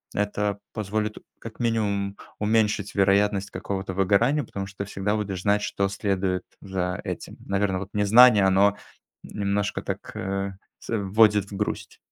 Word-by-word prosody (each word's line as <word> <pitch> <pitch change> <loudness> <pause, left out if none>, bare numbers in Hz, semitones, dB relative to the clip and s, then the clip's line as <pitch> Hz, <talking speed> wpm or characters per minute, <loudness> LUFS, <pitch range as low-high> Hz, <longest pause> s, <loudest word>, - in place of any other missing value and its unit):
это 105 0 -1
позволит, 105 +1 -2 0.2
как 115 -1 -10
минимум, 100 -4 0 0.2
уменьшить 105 -1 +1
вероятность 100 0 +2
какого-то 95 -1 -4
выгорания, 105 +10 +2
потому 100 -2 -5
что 100 +1 -13
ты - - -7
всегда 100 +2 -1
будешь 100 -3 -3
знать, 105 +1 +2
что 100 -1 0
следует 95 -2 -1 0.2
за 90 -2 -3
этим. - - -6
Наверно, 95 -1 0
вот, 100 0 -7
незнание- 105 +1 +7
оно, 100 +2 +4 0.5
немножко 100 0 -2
так, - - -6
э, 95 0 -3 0.2
с - - -14
вводит 105 0 +3
в - - -6
грусть. 105 - -3
100 Hz, 145 wpm, -25 LUFS, 95-105 Hz, 0.5 s, незнание